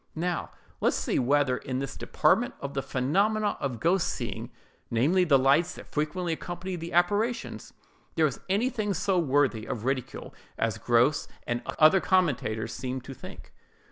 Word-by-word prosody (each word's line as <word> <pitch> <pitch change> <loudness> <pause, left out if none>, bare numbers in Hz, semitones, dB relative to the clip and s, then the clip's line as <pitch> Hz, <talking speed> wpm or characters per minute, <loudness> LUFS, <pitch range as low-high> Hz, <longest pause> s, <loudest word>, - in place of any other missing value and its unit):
Now, 175 +2 -2 0.3
let - - +1
us - - +2
see - - 0
whether 135 0 +2
in 130 0 -4
this 135 0 -4
department 220 +11 +1
of 140 0 -5
the 135 - -1
phenomenon 200 +13 +1
of 125 -5 -3
ghost 175 +2 +2
seeing, - - -4 0.4
namely, 155 +11 +3
the 145 -5 +5
lights 135 +6 +3
that - - -10
frequently 165 +3 -1
accompany 175 +3 -5
the 170 0 -6
apparitions, 205 +7 0 0.4
there 160 - +4
is 135 -6 -2
anything 215 0 0
so 185 +1 +1
worthy 135 -7 +1
of 115 -1 -4
ridicule 130 -2 -3 0.2
as 110 -1 -1
Grose 120 +5 +2 0.2
and 120 0 -2 0.2
other 155 +5 +6
such - - -9
commentators 145 - +1
seem 130 0 -4
to 135 - -9
think. - - -12
150 Hz, 165 wpm, -28 LUFS, 130-180 Hz, 0.4 s, other